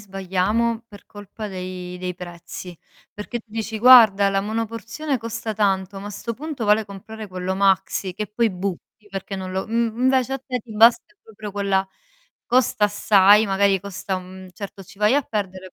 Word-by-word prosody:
sbagliamo 200 Hz, +4 st, -1 dB
per 205 Hz, -2 st, -15 dB
colpa 205 Hz, +1 st, -9 dB
dei 185 Hz, -2 st, -6 dB
dei 180 Hz, -1 st, -4 dB
prezzi, 175 Hz, 0 st, -9 dB, 0.4 s
perché 210 Hz, +3 st, -5 dB
tu -, -, -16 dB
dici: 220 Hz, 0 st, -4 dB
"Guarda, 220 Hz, -5 st, +8 dB
la 195 Hz, 0 st, +1 dB
monoporzione 230 Hz, +6 st, -3 dB
costa 225 Hz, -1 st, -5 dB
tanto, 195 Hz, -2 st, 0 dB
ma 205 Hz, -, -7 dB
a -, -, -7 dB
'sto 230 Hz, +3 st, -5 dB
punto 290 Hz, -2 st, -5 dB
vale 210 Hz, +1 st, +3 dB
comprare 210 Hz, +2 st, -9 dB
quello 185 Hz, 0 st, -3 dB
maxi", 190 Hz, -1 st, +1 dB
che 210 Hz, +4 st, -4 dB
poi 225 Hz, +2 st, 0 dB
butti 195 Hz, +3 st, -6 dB
perché 195 Hz, 0 st, -5 dB
non 185 Hz, -1 st, -6 dB
lo 190 Hz, 0 st, -2 dB
m -, -, -11 dB
mhmm, 230 Hz, 0 st, 0 dB
invece, 260 Hz, 0 st, +2 dB
a 270 Hz, -, -1 dB
te 255 Hz, -2 st, -2 dB
ti 220 Hz, -1 st, -12 dB
basta 220 Hz, -1 st, +5 dB
proprio 210 Hz, -2 st, -9 dB
quella 195 Hz, -1 st, 0 dB, 0.6 s
costa 245 Hz, -4 st, +2 dB
assai, 205 Hz, +1 st, +5 dB
magari 195 Hz, 0 st, +2 dB
costa 195 Hz, 0 st, -4 dB
un 185 Hz, 0 st, -10 dB
certo, 200 Hz, +1 st, -8 dB
ci 200 Hz, +1 st, -17 dB
vai 210 Hz, +4 st, +3 dB
a 290 Hz, -, +3 dB
perdere 190 Hz, -5 st, -5 dB
205 Hz, 180 wpm, -22 LUFS, 190-225 Hz, 0.6 s, Guarda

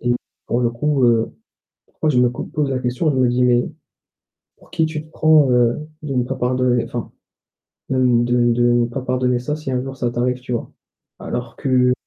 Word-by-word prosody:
et 120 Hz, 0 st, +1 dB, 0.3 s
pour 120 Hz, -, 0 dB
le 120 Hz, -1 st, +1 dB
coup, 135 Hz, +2 st, +1 dB
heu, 115 Hz, -2 st, +2 dB, 0.5 s
pourquoi 155 Hz, -, -3 dB
je 130 Hz, -, +2 dB
me 125 Hz, -, +4 dB
cou 120 Hz, -, -5 dB
pose 145 Hz, -3 st, -2 dB
la 130 Hz, -, 0 dB
question, 125 Hz, +6 st, 0 dB
je 140 Hz, -, -1 dB
me 130 Hz, -1 st, +3 dB
dis: 125 Hz, +1 st, +1 dB
«Mais, 120 Hz, -1 st, +3 dB, 0.9 s
pour -, -, -22 dB
qui 160 Hz, -, +1 dB
tu 155 Hz, -1 st, -4 dB
te 155 Hz, -, -21 dB
prends, 155 Hz, -4 st, +4 dB
heu, 125 Hz, +5 st, +2 dB, 0.2 s
de 140 Hz, -, -3 dB
ne 125 Hz, -2 st, +1 dB
pas 135 Hz, +2 st, -4 dB
pardonner, 125 Hz, -1 st, +1 dB
enfin, -, -, -6 dB, 0.8 s
de 130 Hz, -, 0 dB, 0.3 s
de 120 Hz, 0 st, +2 dB
de 120 Hz, 0 st, +3 dB
pas 125 Hz, +3 st, -5 dB
pardonner 125 Hz, -1 st, 0 dB
ça 135 Hz, +5 st, -3 dB
si 155 Hz, -3 st, -5 dB
un 125 Hz, -1 st, 0 dB
jour 135 Hz, 0 st, -7 dB
ça 120 Hz, -2 st, -1 dB
t'arrive», 125 Hz, +1 st, -1 dB
tu 125 Hz, -, -8 dB
vois? 115 Hz, -, -4 dB, 0.5 s
Alors 120 Hz, -1 st, -5 dB
que 125 Hz, -2 st, +2 dB
125 Hz, 210 wpm, -20 LUFS, 120-135 Hz, 0.9 s, me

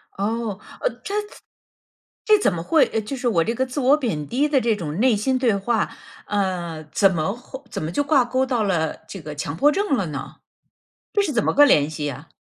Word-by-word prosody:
哦， 215 Hz, 0 st, -2 dB, 0.2 s
呃， -, -, +2 dB
它 400 Hz, -, -5 dB, 1.1 s
这 430 Hz, -1 st, +6 dB
怎 200 Hz, -, +2 dB
么 165 Hz, -, -3 dB
会 310 Hz, -, +4 dB
呃， 220 Hz, -, +1 dB
就 215 Hz, +6 st, -5 dB
是 245 Hz, -, -2 dB
我 175 Hz, -8 st, +3 dB
这 230 Hz, -, -1 dB
个 260 Hz, -, 0 dB
自 255 Hz, +3 st, -4 dB
我 275 Hz, +2 st, +4 dB
贬 195 Hz, -, -2 dB
低 275 Hz, -, +1 dB
的 290 Hz, -2 st, +3 dB
这 230 Hz, -2 st, +2 dB
种 165 Hz, -3 st, -5 dB
内 250 Hz, -1 st, +4 dB
心 255 Hz, +6 st, 0 dB
对 240 Hz, -5 st, +2 dB
话， 215 Hz, +3 st, 0 dB, 0.4 s
呃， 180 Hz, -6 st, -2 dB
怎 195 Hz, +2 st, +4 dB
么 165 Hz, +3 st, -1 dB
会 255 Hz, +3 st, -10 dB
怎 -, -, -4 dB
么 155 Hz, -, -3 dB
就 290 Hz, -, 0 dB
挂 285 Hz, -3 st, +4 dB
钩 255 Hz, +2 st, +1 dB
到 245 Hz, -4 st, 0 dB
了 165 Hz, -6 st, 0 dB
这 195 Hz, -, -8 dB
个 150 Hz, 0 st, -7 dB
强 145 Hz, 0 st, -4 dB
迫 290 Hz, -, +4 dB
症 395 Hz, -3 st, +1 dB
了 195 Hz, -8 st, -1 dB
呢？ 140 Hz, -2 st, -6 dB, 0.8 s
这 410 Hz, -, +3 dB
是 355 Hz, -7 st, -1 dB
怎 235 Hz, -, +1 dB
么 -, -, +2 dB
个 290 Hz, -, +7 dB
联 150 Hz, -, +4 dB
系 150 Hz, -1 st, -4 dB
呀？ 145 Hz, +3 st, -6 dB
220 Hz, 240 characters per minute, -22 LUFS, 170-265 Hz, 1.1 s, 个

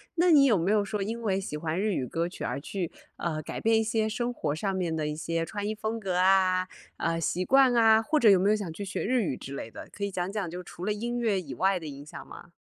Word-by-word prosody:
那 350 Hz, +1 st, +3 dB
你 290 Hz, -4 st, +7 dB
有 235 Hz, -, +5 dB
没 185 Hz, +2 st, +1 dB
有 210 Hz, -1 st, +3 dB
说 210 Hz, 0 st, -3 dB
因 225 Hz, +4 st, -3 dB
为 195 Hz, -3 st, 0 dB
喜 150 Hz, -6 st, -5 dB
欢 160 Hz, +2 st, -2 dB
日 210 Hz, -1 st, +1 dB
语 130 Hz, -, -1 dB
歌 165 Hz, +6 st, -2 dB
曲 -, -, -8 dB
而 -, -, -3 dB
去， 180 Hz, +2 st, -4 dB, 0.3 s
呃， 155 Hz, -2 st, -2 dB
改 -, -, -6 dB
变 225 Hz, 0 st, +3 dB
一 -, -, +1 dB
些 220 Hz, 0 st, 0 dB
生 240 Hz, +3 st, -2 dB
活 150 Hz, -10 st, -2 dB
上 195 Hz, +4 st, -2 dB
面 175 Hz, -3 st, -1 dB
的 155 Hz, -1 st, -1 dB
一 150 Hz, -, -3 dB
些 165 Hz, +1 st, -2 dB
穿 205 Hz, +5 st, -4 dB
衣 215 Hz, -, -1 dB
风 220 Hz, +1 st, -3 dB
格 185 Hz, -4 st, -2 dB
啊， 185 Hz, 0 st, +3 dB, 0.3 s
呃， 165 Hz, 0 st, -1 dB
习 175 Hz, +2 st, -1 dB
惯 265 Hz, +4 st, +5 dB
啊， 225 Hz, -1 st, +5 dB
或 305 Hz, +5 st, +1 dB
者 230 Hz, -, +6 dB
有 195 Hz, -, +7 dB
没 195 Hz, +3 st, +3 dB
有 -, -, +4 dB
想 200 Hz, -6 st, -4 dB
去 200 Hz, +5 st, -6 dB
学 190 Hz, -, -3 dB
日 250 Hz, 0 st, +1 dB
语 145 Hz, -8 st, -1 dB
之 135 Hz, +2 st, -8 dB
类 115 Hz, -, -6 dB
的？ -, -, -9 dB
可 200 Hz, -, -7 dB
以 200 Hz, -, -1 dB
讲 180 Hz, +1 st, -2 dB
讲 205 Hz, -4 st, -2 dB
就 180 Hz, +1 st, -6 dB
除 175 Hz, +1 st, -8 dB
了 210 Hz, -, +1 dB
音 240 Hz, +3 st, -3 dB
乐 215 Hz, -5 st, +1 dB
以 140 Hz, -7 st, -8 dB
外 190 Hz, +5 st, +2 dB
的 160 Hz, -, -8 dB
影 140 Hz, 0 st, -8 dB
响 150 Hz, -, -10 dB
吗？ 175 Hz, -, -12 dB
195 Hz, 310 characters per minute, -28 LUFS, 165-220 Hz, 0.3 s, 你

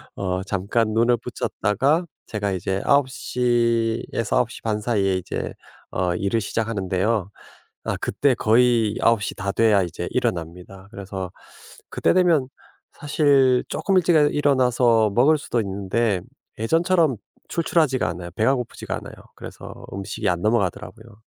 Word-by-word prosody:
어 95 Hz, -1 st, -2 dB
잠깐 100 Hz, +3 st, -1 dB
눈을 120 Hz, +2 st, +3 dB
붙였다가 135 Hz, -, 0 dB, 0.2 s
제가 105 Hz, -2 st, -2 dB
이제 95 Hz, +1 st, -2 dB
9:00 120 Hz, -4 st, +1 dB
에서 115 Hz, +2 st, 0 dB
9:30 115 Hz, -3 st, -1 dB
사이에 100 Hz, -4 st, +1 dB
이제 95 Hz, -, -5 dB, 0.6 s
일을 100 Hz, +4 st, 0 dB
시작하는데요. 100 Hz, -2 st, -1 dB, 0.6 s
아 -, -, -1 dB
그때 140 Hz, -2 st, +1 dB
거의 115 Hz, -1 st, +3 dB
9:00 115 Hz, -3 st, +2 dB
다 100 Hz, 0 st, -3 dB
돼야 105 Hz, -2 st, +3 dB
이제 85 Hz, 0 st, -5 dB
일어납니다. 95 Hz, -4 st, -3 dB
그래서 95 Hz, -3 st, -6 dB, 0.6 s
그때 -, -, +1 dB
되면 165 Hz, -8 st, +3 dB, 0.4 s
사실 140 Hz, -4 st, +3 dB
쪼끔 195 Hz, -, -1 dB
일찍 175 Hz, -1 st, +3 dB
일어나서 125 Hz, -7 st, +3 dB
먹을 145 Hz, +6 st, +5 dB
수도 125 Hz, -5 st, -2 dB
있는데 100 Hz, +1 st, -1 dB, 0.4 s
예전처럼 165 Hz, -, +2 dB, 0.3 s
출출하지가 155 Hz, -5 st, +1 dB
않아요. 85 Hz, +1 st, -6 dB
배가 110 Hz, +5 st, +3 dB
고프지가 125 Hz, -3 st, -5 dB
않아요. -, -, -9 dB, 0.2 s
그래서 -, -, -10 dB, 0.2 s
음식이 95 Hz, -1 st, -4 dB
안 85 Hz, -1 st, -1 dB
넘어가더라고요. 105 Hz, +1 st, -2 dB
115 Hz, 285 characters per minute, -23 LUFS, 100-130 Hz, 0.6 s, 먹을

